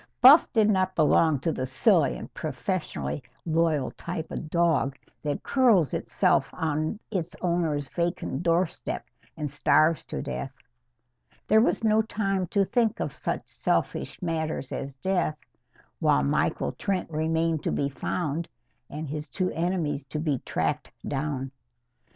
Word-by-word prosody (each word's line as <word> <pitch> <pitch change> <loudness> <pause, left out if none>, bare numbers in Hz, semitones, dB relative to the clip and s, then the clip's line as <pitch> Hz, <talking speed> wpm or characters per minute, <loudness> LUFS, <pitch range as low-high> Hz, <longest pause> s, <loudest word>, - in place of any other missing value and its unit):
Buff 270 +6 +8
did 220 -2 +4
not 185 -2 +2
belong 155 -1 +4
to 165 - +1
the 130 -4 -3
silly 130 -1 +3
and - - -9
professionally 70 +3 -3 0.2
loyal 160 -4 +1
type 165 -2 -6
of 155 - -5
dog 160 -5 +2 0.2
that 145 -1 -3
curls 230 - +4
itself - - +2
on 155 +5 -1
its 175 -5 -2
owner's 165 -5 0
vacant 170 -3 -2
doorstep 170 0 0 0.3
and 150 -1 -2
starves 150 +3 +3
to - - -4
death. 135 -1 -5 0.9
There 220 +1 +5
was 230 - +1
no 220 0 +4
time 195 -4 -1
to 200 +2 +2
think 230 +2 +1
of - - -2
such - - -3
selfish - - -1
matters 160 -5 -2
as 135 -1 -5
death, 175 -1 0 0.6
while 70 - +3
Michael 70 0 +1
Trent 190 - -2
remained 160 0 0
to - - -1
be 140 - 0
found 155 +3 -3 0.4
and 155 +1 -5
his 150 +1 -5
two 185 +3 -1
enemies 165 -4 -1
to 150 +3 -4
be 150 -4 0
tracked - - -2 0.2
down. 135 -2 -2
160 Hz, 140 wpm, -27 LUFS, 145-180 Hz, 0.9 s, Buff